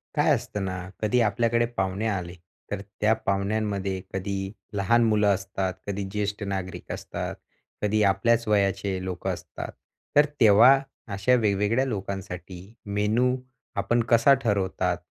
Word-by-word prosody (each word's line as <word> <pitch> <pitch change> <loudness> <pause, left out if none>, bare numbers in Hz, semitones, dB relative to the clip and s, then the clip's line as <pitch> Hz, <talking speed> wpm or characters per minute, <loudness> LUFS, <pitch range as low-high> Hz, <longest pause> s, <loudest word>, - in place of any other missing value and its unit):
काय - - +3
असतं 100 -1 -4
ना, 95 0 -5
कधी 110 +3 +2
आपल्याकडे 115 +2 +2
पाहुणे 95 +3 0
आले 90 -4 -2 0.4
तर 105 -1 -2 0.2
त्या 105 +1 +5
पाहुण्यांमध्ये 100 -1 -1
कधी 95 0 -3 0.2
लहान 105 +4 +3
मुलं 105 -1 +3
असतात, 95 -1 -3
कधी 100 0 -2
ज्येष्ठ 105 0 -2
नागरिक 95 -2 -4
असतात, - - -5 0.5
कधी 105 +1 +1
आपल्याच 110 +4 +2
वयाचे 100 -2 +1
लोकं 95 -1 -3
असतात. - - -7 0.4
तर 145 0 +7
तेव्हा 115 +4 +7 0.3
अशा 100 +6 +3
वेगवेगळ्या 105 +4 +2
लोकांसाठी 95 -5 -5 0.3
मेनू 105 +5 +1 0.4
आपण 100 +4 +1
कसा 115 +4 +6
ठरवतात? 95 -4 0
100 Hz, 125 wpm, -26 LUFS, 95-110 Hz, 0.5 s, तर